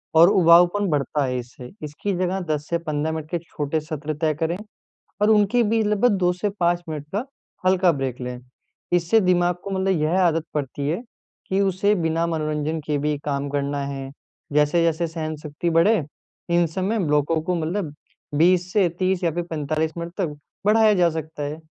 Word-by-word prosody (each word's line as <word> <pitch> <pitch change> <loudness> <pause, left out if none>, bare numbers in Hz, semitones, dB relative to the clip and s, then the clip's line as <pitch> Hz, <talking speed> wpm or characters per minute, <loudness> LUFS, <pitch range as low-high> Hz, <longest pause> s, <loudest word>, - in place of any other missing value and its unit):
और 165 +3 +8
उबाऊपन 180 +2 +5
बढ़ता 145 -1 0
है 125 -1 -1
इससे। 125 0 -10
इसकी 150 +7 -3
जगह 185 +1 0
10 150 0 -2
से 170 - +1
15 155 -1 -2
मिनट 160 -1 -5
के 175 - +1
छोटे 155 -2 -3
सत्र 155 0 -4
तय 155 -1 +2
करें 165 +2 0 0.6
और 210 - +4
उनकी 215 +2 +4
भी 225 +1 +2
लगभग 210 +2 +2
2 180 -1 +2
से 190 +3 -2
5 175 0 +2
मिनट 150 -2 -4
तक 190 - -4
का 230 - -2 0.4
हल्का 185 -1 +4
ब्रेक 135 -5 -3
लें, 125 0 -5 0.5
इससे 175 +5 +4
दिमाग 180 -1 +2
को 200 - -5
मतलब 190 -3 +1
यह 160 +5 +2
आदत 165 -3 +2
पड़ती 140 -1 -3
है 170 +8 -1 0.5
कि 190 - 0
उसे 195 +1 +2
बिना 165 -2 0
मनोरंजन 155 -1 -2
के 150 -1 0
भी 150 +1 -1
काम 140 -1 -1
करना 140 0 -1
है। 135 -1 -5 0.4
जैसे-जैसे 165 +3 +2
सहन-शक्ति 155 0 -4
बढ़े 170 +6 +4 0.5
इन 175 0 +3
सब 175 +4 -4
में 205 -1 0
ब्लॉकों 150 +2 +2
को 180 +3 -1
मतलब 165 -1 -2 0.4
20 180 +2 +3
से 200 -4 +4
30 185 -1 +1
या 170 - +2
फ़िर 175 +2 -2
45 155 0 -1
मिनट 170 0 -5
तक 170 -7 -2 0.3
बढ़ाया 215 0 +5
जा 180 -3 +4
सकता 155 -1 -5
है। 150 +2 -4
165 Hz, 185 wpm, -23 LUFS, 150-185 Hz, 0.6 s, और